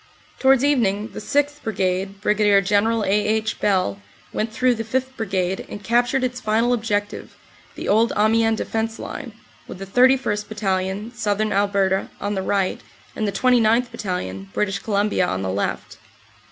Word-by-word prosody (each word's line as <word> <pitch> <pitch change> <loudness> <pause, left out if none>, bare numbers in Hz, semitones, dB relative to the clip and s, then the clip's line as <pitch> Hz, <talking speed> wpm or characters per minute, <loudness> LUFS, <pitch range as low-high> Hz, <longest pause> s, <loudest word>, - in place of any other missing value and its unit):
Towards 265 -1 +4
evening 225 -7 +1
the - - -6
6th. 290 +1 0
Brigade, 195 -1 -2
Brig. 205 -2 +3
General 215 +3 +2
A. - - -1
H. 215 +1 0
Bell, 185 - 0 0.3
went 220 +1 -2
through 250 +3 +2
the 225 -1 -4
5th. 260 +3 -2
Brigade 190 -4 -2
and 205 - -8
captured 245 +4 +2
its 250 0 -2
final 230 +2 +2
objective, 205 -3 -2 0.4
the - - -6
old 225 +3 +3
Amiens 225 +1 +3
defense 225 +1 -2
line, 270 -6 -7 0.4
with - - -8
the 195 - -7
31st. 245 -1 +2
Battalion, 195 0 -2
Southern 215 -2 -1
Alberta, 195 -1 +1
on 205 +1 -2
the 190 - -1
right, 190 0 -1 0.3
and 215 - -1
the - - 0
29th. 240 0 +3
Battalion, 95 - -4
British 195 -2 0
Columbia, 205 -1 0
on 95 0 -2
the 95 - -2
left. 100 - -3
210 Hz, 155 wpm, -22 LUFS, 195-230 Hz, 0.4 s, Towards